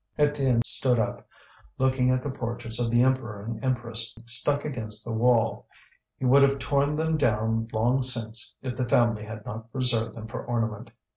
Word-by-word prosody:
Étienne 140 -5 +2
stood 125 -2 +4
up, 110 - -3 0.5
looking 130 -1 +2
at 130 0 +1
the 145 - -3
portraits 120 -2 -3
of 120 -1 0
the 120 +1 +3
Emperor 120 -6 -1
and 115 +2 -6
Empress 120 -3 -1
stuck 140 +5 +1
against 110 -7 -4
the 115 - -4
wall. 115 0 +1 0.5
He 130 - -4
would 135 +3 +6
have 140 0 +4
torn 140 +2 0
them 160 +1 0
down 115 -3 0
long 120 +4 +1
since 115 -3 0
if 130 -2 -4
the 125 -2 -3
family 115 -3 +2
had 110 -1 -9
not 110 +2 -8
preserved 125 -3 +1
them 110 - -8
for 110 - -7
ornament. 115 -1 -3
120 Hz, 175 wpm, -26 LUFS, 115-130 Hz, 0.5 s, would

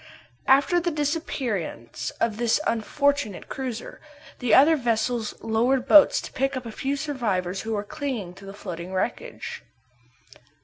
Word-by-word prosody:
After 280 +6 +5
the 345 0 0
disappearance 255 - -3
of 225 -2 0
the 235 +2 +2
unfortunate 280 0 0
cruiser, 250 -3 -5 0.4
the 250 -2 -1
other 305 +4 +7
vessels 235 -3 0
lowered 245 +4 +1
boats 300 -2 +7
to - - -9
pick 270 +1 0
up 255 - -6
a 230 - -6
few 270 +5 -2
survivors 210 - -2
who 225 0 -3
were 205 -1 -1
clinging 235 - -4
to 195 +2 -13
the - - -6
floating 180 -2 -7
wreckage. 185 - -3
240 Hz, 140 wpm, -25 LUFS, 210-280 Hz, 0.4 s, other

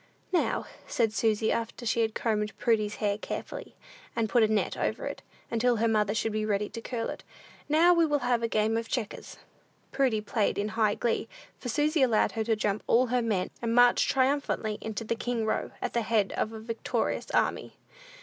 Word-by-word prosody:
"Now," 350 - +1 0.2
said 230 -6 +1
Susy, 220 -1 +1
after 230 +1 -3
she 230 +1 +1
had 220 -1 0
combed 215 -2 -1
Prudy's 215 -3 +1
hair 205 -1 -1
carefully, - - -6 0.4
and 230 -1 +1
put 240 - +4
a 220 - +5
net 215 -1 0
over - - -2
it, - - -5 0.3
until 240 +1 +2
her 230 +1 +1
mother 210 -1 +1
should 225 0 0
be 215 0 -1
ready 210 -1 0
to 230 - -7
curl 230 -1 -3
it, - - -9 0.5
"now 330 +4 +6
we 335 -2 +4
will 295 -1 +2
have 245 -1 +2
a 230 - +1
game 220 0 +1
of 230 0 -4
checkers." 230 -5 -4 0.5
Prudy 255 -6 +2
played 210 0 0
in 205 +1 -1
high 215 -1 +1
glee, 230 -1 -1 0.3
for 245 - -5
Susy 300 +5 +1
allowed 235 -5 +3
her 220 - -2
to 225 -1 +2
jump 210 -1 -1
all 245 +3 +4
her 250 - +3
men, 210 -6 -1
and 230 -1 0
march 245 0 +5
triumphantly 260 -5 +1
into 220 0 -4
the 225 - -1
king 230 -1 -2
row, 220 - -1
at - - -2
the 235 - +1
head 215 -3 +1
of 215 - -1
a 220 - -7
victorious 225 +1 -2
army. - - 0
225 Hz, 200 wpm, -28 LUFS, 215-245 Hz, 0.5 s, now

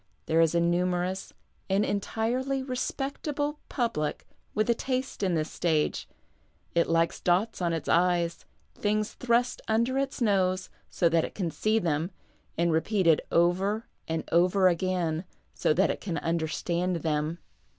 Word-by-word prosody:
"' - - -43
There 165 +1 +3
is 165 0 +3
a - - +4
numerous, 180 +2 0 0.4
and 195 +2 +3
entirely 245 +6 -1
respectable, 280 +3 -3
public 190 - -1 0.3
with 215 0 +2
a 235 - +4
taste 255 +1 -3
in 185 -3 +1
this 155 -1 -1
stage; 160 -3 0 0.6
it 170 0 +2
likes 165 0 +2
dots 185 +4 +1
on 170 -1 +1
its 165 -2 -3
i's, 170 -1 +2 0.3
things 215 0 -1
thrust 245 0 +1
under 235 +4 +1
its 275 - -2
nose, 185 -5 +1 0.2
so 170 - +2
that 165 -1 +3
it - - -5
can 175 -5 -2
see 215 +6 +1
them, 165 -4 0 0.5
and 170 +1 +2
repeated 165 0 +3
over 190 +6 +2 0.2
and 160 0 -3
over 180 +3 +4
again, 175 -2 0 0.3
so - - +1
that 185 +6 +3
it - - -6
can 175 -5 -3
under 165 -1 -1
stand 175 +3 -1
them. 155 +1 0
180 Hz, 150 wpm, -28 LUFS, 170-220 Hz, 0.6 s, a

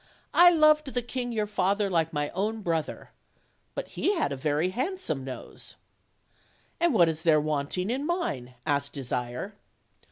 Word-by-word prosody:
I 350 +1 +9
loved 305 -5 +4
the 245 - 0
king 245 0 -3
your 215 -2 0
father 205 0 +1
like 165 -4 +1
my 145 -1 -1
own 215 +3 -2
brother; 165 -3 -2 0.6
but - - -4
he 405 - 0
had 325 - 0
a - - -1
very 150 +5 0
handsome 260 - -2
nose." 130 -1 -8 1.0
"And 340 0 +3
what 175 -5 +6
is 160 -1 -2
there 160 -2 +4
wanting 155 +6 -1
in 275 +4 -2
mine?" 140 - -2
asked 140 -2 0
Desire. 125 - -4
185 Hz, 155 wpm, -27 LUFS, -, 1.0 s, I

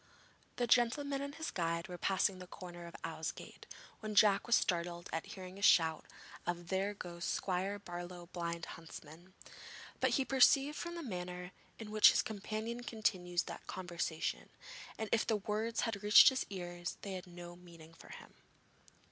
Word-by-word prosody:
The 245 - 0
gentleman 275 +4 +2
and 280 +1 -5
his 320 -1 -4
guide 170 -1 -1
were 180 - -6
passing 190 0 +1
the 180 - -9
corner 175 -2 -9
of 170 - -11
Ousegate, 160 -1 -6 0.3
when 215 -1 -5
Jack 205 0 +5
was 235 - +5
startled 175 -1 0
at 160 - -2
hearing 185 0 -9
a - - -10
shout 165 -5 +5 0.4
of 175 -1 -3
'There 195 +2 0
goes 170 -3 -7
Squire 190 +3 -1
Barlow's 175 -2 -8
Blind 170 -1 -3
Huntsman,' 165 +3 -11 0.6
but - - +3
he 270 - +1
perceived 270 +3 +5
from 345 +2 -5
the 340 - -5
manner 180 -5 -5 0.3
in 215 -2 -8
which 215 0 +8
his - - +3
companion 220 +3 -4
continued 180 -7 0
the - - -7
conversation 175 -3 -3 0.5
that 220 -1 -3
if 230 - +2
the 220 - +2
words 215 +3 -1
had 220 -4 -2
reached 210 +6 +9
his 265 -1 -2
ears, 175 -2 -5
they 200 - -4
had 185 0 -6
no 175 0 -9
meaning 170 -2 -14
for - - -15
him. - - -11
185 Hz, 165 wpm, -35 LUFS, 175-220 Hz, 0.6 s, reached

